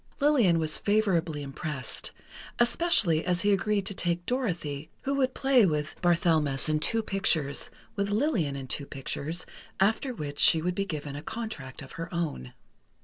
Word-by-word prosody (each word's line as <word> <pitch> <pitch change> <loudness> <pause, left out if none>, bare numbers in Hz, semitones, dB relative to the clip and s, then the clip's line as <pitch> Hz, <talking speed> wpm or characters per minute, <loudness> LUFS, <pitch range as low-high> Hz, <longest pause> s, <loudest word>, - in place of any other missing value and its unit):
Lillian 265 - +4
was 155 -1 0
favorably 175 -8 +1
impressed, 140 -2 -5 0.5
especially 235 - +3
as 180 -1 0
he 205 0 +3
agreed 200 0 0
to 200 - -3
take 175 -2 -1
Dorothy, 170 - -2
who 275 - -1
would 260 -2 +1
play 265 -3 +4
with 150 -5 0
Barthelmess 160 -6 +2
in 155 0 +1
two 225 +8 +1
pictures, 160 -9 0 0.3
with 200 0 -1
Lillian 205 - +1
in 135 -1 -5
two 140 +2 -2
pictures, 150 +4 -2 0.3
after 220 +7 +2
which 145 -10 -6
she 165 - +6
would 180 +3 -1
be 195 +2 -1
given 150 -4 -5
a 145 - -5
contract 160 - -6
of 130 - -12
her 165 - -6
own. 160 - -3
175 Hz, 160 wpm, -28 LUFS, 150-210 Hz, 0.5 s, she